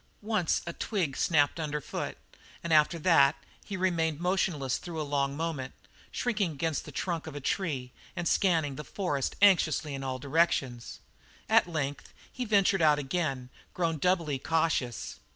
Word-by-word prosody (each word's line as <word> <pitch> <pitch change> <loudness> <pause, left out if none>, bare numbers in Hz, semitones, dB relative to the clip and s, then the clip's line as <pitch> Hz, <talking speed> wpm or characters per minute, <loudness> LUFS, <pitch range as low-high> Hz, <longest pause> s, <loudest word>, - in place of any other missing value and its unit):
Once 210 -6 0
a 170 - -4
twig 170 -11 -2
snapped 150 -1 +2
under 150 -2 -2
foot, - - -5 0.5
and 170 -1 0
after 155 +2 +4
that 150 -5 +5 0.3
he 200 - -5
remained 165 -4 0
motionless 175 -7 0
through 170 -3 -6
a - - -1
long 140 -1 -1
moment, 155 -5 -3 0.4
shrinking 210 -9 -1
against 155 +1 -2
the - - -9
trunk 170 -3 -3
of 155 - -7
a - - -4
tree 140 -4 -2 0.2
and 175 -2 -2
scanning 160 -9 +2
the 150 - -5
forest 150 -9 -2
anxiously 160 -6 +4
in 135 0 -5
all 130 -1 -2
directions. 135 -4 0 0.5
At - - +4
length 145 -4 -4 0.2
he 255 - -3
ventured 200 -3 +3
out 150 -2 +5
again, 135 -3 -2 0.2
grown 165 -3 0
doubly 165 -5 +1
cautious. 155 - -1
160 Hz, 155 wpm, -29 LUFS, 140-175 Hz, 0.5 s, that